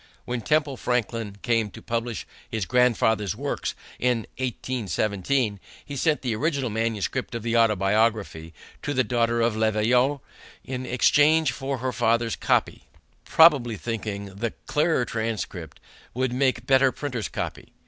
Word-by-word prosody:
When 120 -1 -3
Temple 145 +3 +1
Franklin 115 -4 -2
came 115 -3 +1
to - - -11
publish 115 0 -3 0.2
his 110 -5 -2
grandfather's 110 -5 +2
works - - -3 0.2
in 125 -2 +1 0.2
1817, 110 -2 -1 0.3
he 145 - -7
sent 150 +2 +1
the 120 -4 -1
original 140 -1 -1
manuscript 115 +3 -2
of 115 - -4
the 115 0 -1
Autobiography 105 -5 +2 0.3
to 145 - -3
the 130 - +3
daughter 115 0 +1
of 115 -1 +2
Le 110 0 +2
Veillard 125 +6 +2 0.4
in 130 -1 -5
exchange 150 +4 +4
for 135 +1 -3
her 130 +1 -2
father's 115 -1 +1
copy, - - 0 0.4
probably 135 -9 +5
thinking 105 -2 -4
the 115 +3 -3
clearer 150 -4 +1
transcript 110 -8 -4 0.4
would 130 0 0
make 130 -2 +1
better 135 0 +4
printer's 125 -7 -4
copy. - - -5
120 Hz, 140 wpm, -25 LUFS, 110-130 Hz, 0.4 s, probably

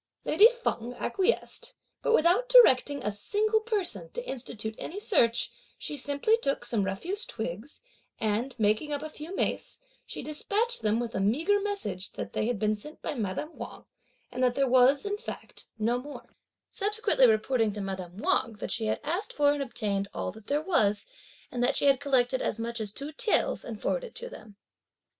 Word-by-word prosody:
Lady 430 - +7
Feng 250 - -3
acquiesced; 475 - -1 0.3
but - - +1
without 425 +5 +4
directing 290 - +6
a 210 - 0
single 425 - +1
person 435 0 -2
to 485 0 -5
institute 230 -4 -4
any 385 - -5
search, 235 - +2 0.3
she 295 - -4
simply 285 - +1
took 275 -12 -1
some 220 -4 0
refuse 350 - -3
twigs, 220 - -6 0.4
and 225 +4 -1
making 220 +7 +1
up 290 0 -2
a 310 - -5
few 310 +5 -8
mace, - - -2 0.2
she - - -7
despatched 420 +10 0
them 215 +1 +1
with 240 -1 -3
the 190 - -2
meagre 315 - +2
message 215 - -3
that - - -6
they 215 - 0
had 245 -2 0
been 215 +1 +1
sent 300 +10 -11
by 315 - -2
madame 230 - -4
Wang, - - -9 0.5
and 255 +1 -2
that 250 -1 +3
there 275 -1 +2
was, 260 +5 +5
in 410 0 -2
fact, - - -8
no 230 +3 +1
more; 290 +3 -9 0.5
subsequently 415 - +3
reporting 225 0 +2
to 205 - -6
madame 190 -2 -5
Wang 225 +1 +2
that 210 - -6
she 220 -2 0
had - - 0
asked 350 +8 -2
for 290 -1 +3
and 290 - -3
obtained 205 -6 -1
all - - -2
there 225 +9 -3
was 215 - +2 0.5
and 245 -1 -1
that 270 +3 +2
she - - +2
had 275 -2 +5
collected 260 -2 +2
as - - -1
much 230 0 -3
as 210 -2 -2
two 280 +7 -6
taels, 435 +8 +2
and 225 -3 -7
forwarded - - -1
it 455 - -18
to - - -3
them. 215 - -12
265 Hz, 185 wpm, -28 LUFS, -, 0.5 s, Lady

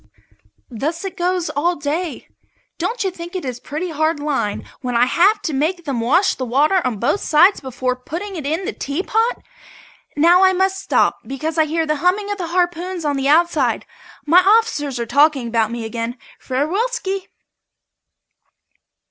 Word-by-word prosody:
Thus 310 - -3
it 385 - -5
goes 360 -1 -1
all 345 +5 0
day. 305 +4 -3 0.5
Don't 470 -1 -1
you 385 - -1
think 345 +1 -9
it 365 - -4
is 250 -2 -4
pretty 325 +7 -5
hard 315 0 0
lines 285 -8 -2 0.2
when 250 -2 -3
I 240 +1 +5
have 400 - +3
to 315 - -2
make 325 +5 -1
them 275 -5 -2
wash 335 - +3
the 260 - -5
water 295 +10 +2
on 250 -4 -1
both 240 - 0
sides 355 +5 +4
before 255 -1 -2
putting 345 +10 -6
it 320 - -5
in 320 +7 -2
the - - -3
teapot? 420 - -1 0.7
Now 345 +5 +5
I 375 0 +5
must 380 +1 +1
stop - - +1
because 310 +4 -3
I 315 - +5
hear 320 +1 -1
the 305 -1 0
humming 385 +6 +1
of 405 - -4
the 350 - -3
harpoons 350 0 -1
on 290 -1 +1
the 275 0 -1
outside. 305 -5 +2 0.4
My 330 +4 +6
officers 360 - +2
are 235 - -2
talking 285 0 +3
about 225 -2 +1
me 235 -1 -5
again. 230 +2 -4 0.2
Farewellski! 385 - -2
320 Hz, 170 wpm, -19 LUFS, 270-365 Hz, 0.7 s, My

